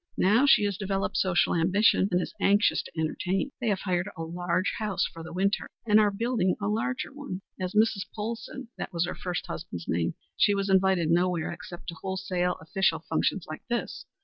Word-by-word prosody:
Now 225 Hz, +9 st, +4 dB
she 240 Hz, -, +6 dB
has 200 Hz, -2 st, 0 dB
developed 195 Hz, -1 st, -1 dB
social 185 Hz, -2 st, +2 dB
ambition 190 Hz, +3 st, +3 dB
and 180 Hz, -, +3 dB
is -, -, -4 dB
anxious 205 Hz, +2 st, +4 dB
to -, -, -12 dB
entertain. 185 Hz, -, -1 dB
They 240 Hz, -, -1 dB
have 200 Hz, -3 st, +1 dB
hired 180 Hz, -2 st, 0 dB
a 165 Hz, -, -3 dB
large 175 Hz, +2 st, -1 dB
house 210 Hz, -4 st, 0 dB
for 165 Hz, -, -7 dB
the 160 Hz, -, -8 dB
winter 195 Hz, +3 st, 0 dB, 0.2 s
and 215 Hz, -1 st, +6 dB
are 210 Hz, -1 st, +5 dB
building 205 Hz, -3 st, 0 dB
a 200 Hz, -, -2 dB
larger 230 Hz, +6 st, -1 dB
one. 275 Hz, -10 st, -6 dB, 0.2 s
As 185 Hz, +1 st, -3 dB
Mrs. 210 Hz, -3 st, +3 dB
Polsen 230 Hz, +3 st, -5 dB
that -, -, -4 dB
was 170 Hz, -1 st, 0 dB
her -, -, -3 dB
first 180 Hz, -2 st, -4 dB
husband's 85 Hz, -, -6 dB
name 85 Hz, 0 st, 0 dB, 0.2 s
she 205 Hz, -, +4 dB
was 195 Hz, 0 st, 0 dB
invited 190 Hz, -4 st, +3 dB
nowhere 175 Hz, -1 st, +1 dB
except 175 Hz, 0 st, -9 dB
to 170 Hz, -, -6 dB
wholesale 185 Hz, -2 st, -1 dB
official 165 Hz, -1 st, 0 dB
functions 165 Hz, +3 st, 0 dB
like 155 Hz, -, -7 dB
this. 240 Hz, 0 st, -3 dB
190 Hz, 195 wpm, -28 LUFS, 175-210 Hz, 0.2 s, she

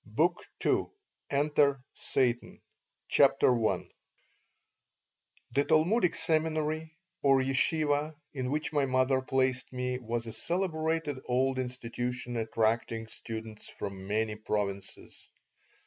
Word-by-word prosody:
BOOK -, -, 0 dB, 0.2 s
II -, -, +3 dB, 0.4 s
ENTER 145 Hz, -1 st, +3 dB
SATAN 120 Hz, -2 st, 0 dB, 0.5 s
CHAPTER 125 Hz, -, +5 dB, 0.2 s
I -, -, -2 dB, 1.6 s
THE 140 Hz, -, +3 dB
Talmudic 170 Hz, +6 st, +3 dB
seminary, 155 Hz, 0 st, 0 dB, 0.2 s
or 135 Hz, -1 st, +5 dB
yeshivah, 145 Hz, +3 st, +1 dB, 0.2 s
in 130 Hz, -3 st, -2 dB
which 150 Hz, +3 st, -2 dB
my 145 Hz, -2 st, +2 dB
mother 130 Hz, +1 st, +2 dB
placed 130 Hz, -1 st, 0 dB
me 125 Hz, 0 st, -2 dB
was 120 Hz, -1 st, -3 dB
a 115 Hz, -, -5 dB
celebrated 160 Hz, -5 st, -1 dB
old 130 Hz, +1 st, +2 dB
institution, 125 Hz, 0 st, -3 dB
attracting 115 Hz, 0 st, 0 dB
students 110 Hz, -1 st, -8 dB
from 95 Hz, -1 st, -6 dB
many 110 Hz, +1 st, 0 dB
provinces. 100 Hz, -2 st, -4 dB
130 Hz, 100 wpm, -30 LUFS, 115-150 Hz, 1.6 s, CHAPTER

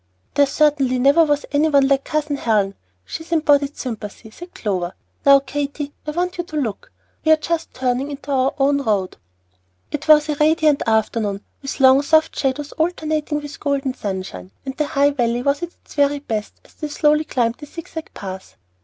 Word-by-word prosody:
"There 285 Hz, -1 st, +4 dB
certainly 275 Hz, -3 st, +2 dB
never 280 Hz, +6 st, +5 dB
was 295 Hz, -1 st, 0 dB
any 300 Hz, +2 st, +3 dB
one 280 Hz, -2 st, +4 dB
like 275 Hz, 0 st, +2 dB
Cousin 300 Hz, -1 st, -1 dB
Helen. 210 Hz, -6 st, +1 dB, 0.3 s
She -, -, -6 dB
is 335 Hz, -, -18 dB
embodied 290 Hz, -3 st, +2 dB
sympathy," 220 Hz, -2 st, -6 dB
said 350 Hz, +9 st, -12 dB
Clover. 185 Hz, -4 st, -2 dB, 0.3 s
"Now, 275 Hz, 0 st, +8 dB
Katy, 285 Hz, +1 st, -4 dB
I -, -, -1 dB
want 360 Hz, +3 st, -2 dB
you -, -, 0 dB
to 310 Hz, -, -10 dB
look. 240 Hz, -9 st, -3 dB, 0.3 s
We 315 Hz, -, +4 dB
are 315 Hz, -, +7 dB
just 330 Hz, +1 st, -2 dB
turning 255 Hz, +2 st, -1 dB
into 280 Hz, -1 st, -7 dB
our 265 Hz, 0 st, +1 dB
own 280 Hz, 0 st, +2 dB
road." 205 Hz, -7 st, -1 dB, 0.7 s
It 295 Hz, +1 st, -4 dB
was 305 Hz, 0 st, +6 dB
a 300 Hz, -, 0 dB
radiant 305 Hz, -1 st, +3 dB
afternoon, 220 Hz, -2 st, 0 dB, 0.2 s
with 275 Hz, +1 st, -5 dB
long, 265 Hz, 0 st, +6 dB
soft 315 Hz, +2 st, +3 dB
shadows 280 Hz, +2 st, -1 dB
alternating 310 Hz, -2 st, -1 dB
with 290 Hz, -1 st, -9 dB
golden 280 Hz, -2 st, -1 dB
sunshine, 185 Hz, -, -5 dB, 0.2 s
and 265 Hz, -1 st, -5 dB
the 300 Hz, 0 st, -1 dB
High 285 Hz, +1 st, +3 dB
Valley 240 Hz, -3 st, 0 dB
was 280 Hz, +1 st, +1 dB
at 345 Hz, -, -3 dB
its -, -, -19 dB
very 285 Hz, 0 st, +2 dB
best 220 Hz, -7 st, -4 dB
as -, -, -21 dB
they 305 Hz, -, -5 dB
slowly 300 Hz, +1 st, +2 dB
climbed 240 Hz, -5 st, -1 dB
the 295 Hz, -, -9 dB
zigzag 320 Hz, 0 st, -8 dB
pass. 190 Hz, -1 st, -8 dB
280 Hz, 190 wpm, -20 LUFS, 250-300 Hz, 0.7 s, Now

